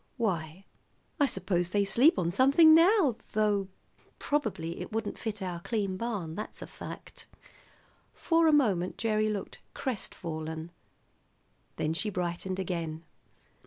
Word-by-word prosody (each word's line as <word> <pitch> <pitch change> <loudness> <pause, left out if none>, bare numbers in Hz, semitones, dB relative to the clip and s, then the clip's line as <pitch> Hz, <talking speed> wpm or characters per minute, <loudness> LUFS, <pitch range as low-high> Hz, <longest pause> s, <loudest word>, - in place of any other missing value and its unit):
"Why, 180 -5 -2 0.5
I 285 - +5
suppose 180 -5 -1
they 200 +1 +1
sleep 240 - +4
on 170 -2 0
something 280 - +6
now, 330 - +5 0.2
though 205 -2 +1 0.5
probably 210 - -2
it - - -7
wouldn't 220 -1 -3
fit 210 -3 -4
our 180 -2 -4
clean 195 0 -2
barn; 200 -7 -3
that's 210 +5 -6
a - - -6
fact." - - -10 0.9
For 330 -1 +3
a - - +6
moment 205 - +2
Gerry 215 -1 +1
looked 205 -2 -5 0.2
crestfallen. 160 - -5 1.0
Then 155 - -1
she 210 +6 -2
brightened 180 0 -3
again. 170 -4 -3
200 Hz, 125 wpm, -29 LUFS, 175-235 Hz, 1.0 s, something